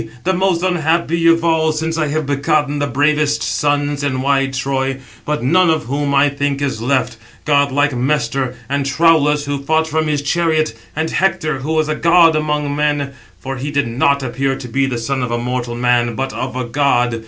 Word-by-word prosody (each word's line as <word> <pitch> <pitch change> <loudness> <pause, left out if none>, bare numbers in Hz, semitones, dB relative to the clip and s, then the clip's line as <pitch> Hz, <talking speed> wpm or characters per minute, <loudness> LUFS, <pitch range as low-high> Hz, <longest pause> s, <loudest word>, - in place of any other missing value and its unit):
the 190 - +1
most 185 -2 0
unhappy 170 -1 +1
of 165 0 +4
all, 160 -1 +2
since 160 +1 -2
I 155 -2 0
have 155 +1 -2
begotten 145 +1 0
the 145 - 0
bravest 150 +2 +1
sons 145 0 0
in 130 -2 -1
wide 135 -1 +1
Troy; 135 0 -2 0.3
but 150 -4 -2
none 180 +6 +3
of 160 -1 +1
whom 140 +3 -1
I 140 +1 +5
think 140 0 -2
is 135 -6 -2
left: 125 -1 0 0.3
godlike 145 -1 +2
Mestor, 130 -1 -1
and 140 +2 -1
Troulus, 150 0 +2
who 140 -1 -3
fought 160 +3 +1
from 160 0 -1
his 145 -1 -1
chariot, 155 -4 0 0.2
and 160 +1 -2
Hector, 155 -7 0
who 150 +4 -3
was 155 -1 +1
a 155 - 0
god 165 0 +4
among 150 -2 -1
men, 145 -2 -1 0.3
for 135 0 -5
he 135 +4 -4
did 145 -3 0
not 140 +4 +1
appear 135 +2 -1
to 130 - -8
be 135 +3 0
the 125 -2 -3
son 130 +3 -2
of 125 - -2
a 120 - -1
mortal 120 0 -3
man, 120 -1 +1
but 135 +2 -3
of 130 0 -4
a 130 -1 -2
god. 120 -2 +1
145 Hz, 200 wpm, -17 LUFS, 135-155 Hz, 0.3 s, I